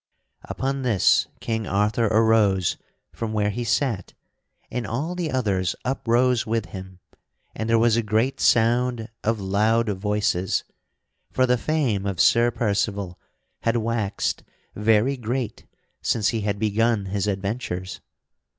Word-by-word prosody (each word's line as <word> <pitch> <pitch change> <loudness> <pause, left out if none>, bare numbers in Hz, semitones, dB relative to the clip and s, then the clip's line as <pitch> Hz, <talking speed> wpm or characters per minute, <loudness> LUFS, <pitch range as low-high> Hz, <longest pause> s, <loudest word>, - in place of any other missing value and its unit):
Upon 135 +1 -2
this 115 -8 +3
King 110 -2 -2
Arthur 105 +3 +1
arose 110 -4 +3 0.4
from 115 -1 -4
where 105 -1 +1
he 120 +4 -3
sat 115 -4 -1 0.6
and 120 -4 -3
all 145 - -2
the 175 -3 -2
others 100 - 0
uprose 125 -1 +2
with 110 -1 -1
him 95 +1 -9 0.6
and 110 +1 -4
there 115 - +4
was 115 0 +4
a - - +3
great 110 +4 0
sound 120 0 +2
of 115 0 0
loud 105 +4 +1
voices; 100 -2 0 0.7
for 130 - +2
the 125 0 +3
fame 125 -8 0
of 95 -4 -3
Sir 115 +7 +5
Percival 100 -5 -1 0.4
had 115 +1 +1
waxed 110 -3 -1 0.3
very 110 +5 +2
great 120 -1 -4 0.3
since 110 -3 +1
he 115 -2 -1
had 100 0 -1
begun 110 0 +1
his 100 +1 -2
adventures. 95 -2 -3
110 Hz, 130 wpm, -24 LUFS, 100-120 Hz, 0.7 s, Sir